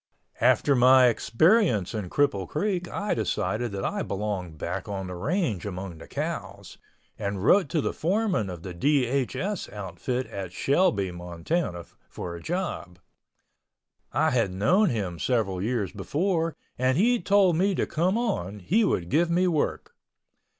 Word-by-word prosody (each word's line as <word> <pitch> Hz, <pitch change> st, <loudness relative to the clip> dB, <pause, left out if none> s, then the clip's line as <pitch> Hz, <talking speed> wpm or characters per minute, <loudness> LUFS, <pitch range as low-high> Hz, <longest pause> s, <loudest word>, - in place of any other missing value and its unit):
After 130 Hz, +4 st, +4 dB
my 130 Hz, 0 st, +7 dB
experience 120 Hz, -, +2 dB
in 105 Hz, -5 st, -4 dB
Cripple 100 Hz, -11 st, +1 dB
Creek 185 Hz, -4 st, -1 dB
I 205 Hz, +3 st, -2 dB
decided 110 Hz, +1 st, -1 dB
that 95 Hz, -, -3 dB
I -, -, -1 dB
belonged 95 Hz, -5 st, -3 dB
back 90 Hz, +7 st, -4 dB
on 95 Hz, -1 st, -3 dB
the 90 Hz, -, -6 dB
range 120 Hz, -, -1 dB
among 95 Hz, -4 st, -6 dB
the -, -, -11 dB
cows, -, -, -5 dB, 0.4 s
and 100 Hz, -1 st, -3 dB
wrote 185 Hz, -2 st, +5 dB
to 160 Hz, -, +1 dB
the -, -, -2 dB
foreman 185 Hz, -, 0 dB
of 85 Hz, -2 st, -8 dB
the 95 Hz, -, -6 dB
DHS 140 Hz, -, 0 dB
outfit 105 Hz, +6 st, -4 dB
at 95 Hz, -2 st, -7 dB
Shelby, 135 Hz, -, +2 dB
Montana, 85 Hz, -, -3 dB, 0.2 s
for 85 Hz, -1 st, -6 dB
a 85 Hz, -, -9 dB
job. 170 Hz, -, -4 dB, 1.1 s
I -, -, +2 dB
had 115 Hz, -6 st, +1 dB
known 175 Hz, -, +3 dB
him 95 Hz, -7 st, -3 dB
several 105 Hz, -7 st, 0 dB
years 110 Hz, -3 st, -1 dB
before 165 Hz, -, -1 dB, 0.2 s
and 130 Hz, +1 st, +2 dB
he 240 Hz, +4 st, +3 dB
told 195 Hz, -2 st, +4 dB
me 190 Hz, +3 st, +2 dB
to -, -, 0 dB
come 180 Hz, +6 st, 0 dB
on, 185 Hz, -, -2 dB
he 195 Hz, -, +1 dB
would 90 Hz, -, 0 dB
give 165 Hz, -, +2 dB
me 180 Hz, +2 st, +2 dB
work. 160 Hz, -4 st, -1 dB
120 Hz, 150 wpm, -26 LUFS, -, 1.1 s, my